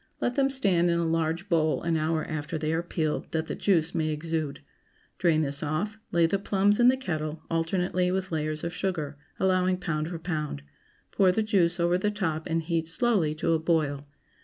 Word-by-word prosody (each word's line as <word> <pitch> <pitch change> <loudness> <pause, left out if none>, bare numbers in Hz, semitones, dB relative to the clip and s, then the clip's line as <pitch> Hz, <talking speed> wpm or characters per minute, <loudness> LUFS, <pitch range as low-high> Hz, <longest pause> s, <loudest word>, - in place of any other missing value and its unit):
Let 245 - 0
them 275 +1 +2
stand 190 -10 +2
in 170 - +2
a 170 - 0
large 165 +3 -1
bowl 160 -4 +1
an 170 -1 +1
hour 160 0 0
after 155 +1 -4
they 155 +1 -1
are 165 - +1
peeled, 160 -3 -2
that 160 0 0
the - - -4
juice 170 -6 +2
may 155 -1 0
exude. 155 -2 -3 0.6
Drain 165 -3 +3
this 140 -1 -1
off; 185 +9 -2
lay 170 -1 +4
the 195 +4 +1
plums 200 +1 +2
in 240 - +6
the 260 +1 +5
kettle, 155 -9 -4
alternately 180 +2 0
with 190 0 -2
layers 155 -1 -2
of 170 0 -3
sugar, 165 -6 -2 0.2
allowing 185 -1 +2
pound 155 -4 -2
for 170 0 -5
pound; 155 - -4 0.5
pour 190 -2 +4
the 220 +4 +1
juice 185 -5 +2
over 175 +1 +2
the 210 - +1
top 165 -7 -2
and 165 -1 0
heat 165 -1 -1
slowly 165 -4 +1
to 155 - 0
a 165 - +3
boil. 150 -4 0
165 Hz, 200 wpm, -27 LUFS, 155-185 Hz, 0.6 s, in